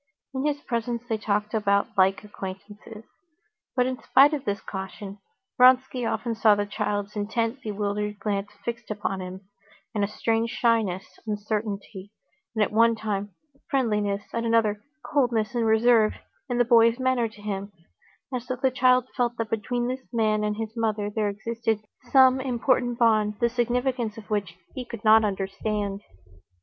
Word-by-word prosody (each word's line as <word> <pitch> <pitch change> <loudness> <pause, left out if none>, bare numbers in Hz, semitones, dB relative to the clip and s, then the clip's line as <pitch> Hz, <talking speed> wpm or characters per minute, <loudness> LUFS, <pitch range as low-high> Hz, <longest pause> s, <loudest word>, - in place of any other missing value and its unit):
In 265 0 -2
his 290 -1 -1
presence 235 -1 -2
they 220 -3 -1
talked 210 +1 -1 0.4
like 190 +1 +3
acquaintances. 205 +2 -9 0.7
But 250 -1 +3
in 255 0 -3
spite 285 +3 +5
of 285 -2 -3
this 200 -2 -1
caution, 195 +1 -7 0.4
Vronsky 255 -1 +5
often 230 +1 -2
saw 220 -1 +5
the 205 0 -1
child's 205 0 -3
intent, 225 +4 -1
bewildered 210 -1 -2
glance 205 -1 -2 0.2
fixed 235 -1 -5
upon 205 -2 -3
him, 185 +1 -7 0.5
and 210 -2 0
a - - +2
strange 225 +2 0
shyness, 225 -6 0
uncertainty, 205 -2 -4 0.5
at 210 - +2
one 230 +2 +4
time 205 -3 -4 0.3
friendliness, 210 -6 0
at 230 - -1
another, 225 -3 +2 0.2
coldness 240 -5 +1
and 235 -2 +1
reserve, 220 0 +4 0.3
in 245 - -1
the 245 - +4
boy's 230 0 +5
manner 260 -2 +1
to 215 - -17
him; 200 -1 -4 0.6
as 250 -1 -3
though 255 - -1
the 260 +1 +1
child 255 -1 +3
felt 240 -2 0
that 230 -1 -3
between 240 +2 -1
this 255 +1 -3
man 215 -3 +1
and 210 0 -1
his 220 0 -5
mother 215 -2 -1
there 210 -1 0
existed 225 +1 -2 0.3
some 260 -1 +6
important 245 -1 +1
bond, 215 -3 +3
the 235 - +3
significance 245 -1 -1
of 215 -1 -11
which 195 -5 -2 0.2
he 255 - -5
could 235 -3 -9
not 220 +1 +7
understand. 200 0 -2
220 Hz, 155 wpm, -26 LUFS, 205-240 Hz, 0.7 s, not